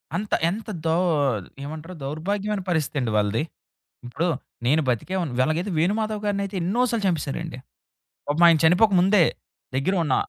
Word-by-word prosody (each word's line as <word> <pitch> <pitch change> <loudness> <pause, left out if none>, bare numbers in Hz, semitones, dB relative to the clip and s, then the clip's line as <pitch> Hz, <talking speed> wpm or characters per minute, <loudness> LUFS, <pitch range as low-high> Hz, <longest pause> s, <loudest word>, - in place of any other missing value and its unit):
అంత 205 +4 -3 0.2
ఎంత 210 +5 -5 0.2
దో 160 0 +2 0.7
ఏమంటారు 155 +4 -7
దౌర్భాగ్యమైన 195 +8 -2
పరిస్థితి 160 -4 0
అండి 120 -4 -1
వాళ్ళది. 105 +5 +1
హ్మ్. 160 - -15 0.4
ఇప్పుడు 165 +8 -1 0.4
నేను 150 +6 +3
బతికేవు 180 - -1 0.2
ఎలాగైతే 170 +7 -1
'వేణుమాధవ్' 215 +4 0
గారినైతే 200 -1 -1
ఎన్నో 200 +8 +1
సార్లు 230 -3 -1
చంపెసారండి. 165 -3 -2 0.7
పాపం 155 +4 +3
ఆయన 165 -1 +5
చనిపోక 180 +6 +5
ముందే. 190 0 +5 0.5
దెగ్గర 140 +9 +1
ఉన్న 145 - +1
170 Hz, 140 wpm, -24 LUFS, 155-200 Hz, 0.7 s, ఆయన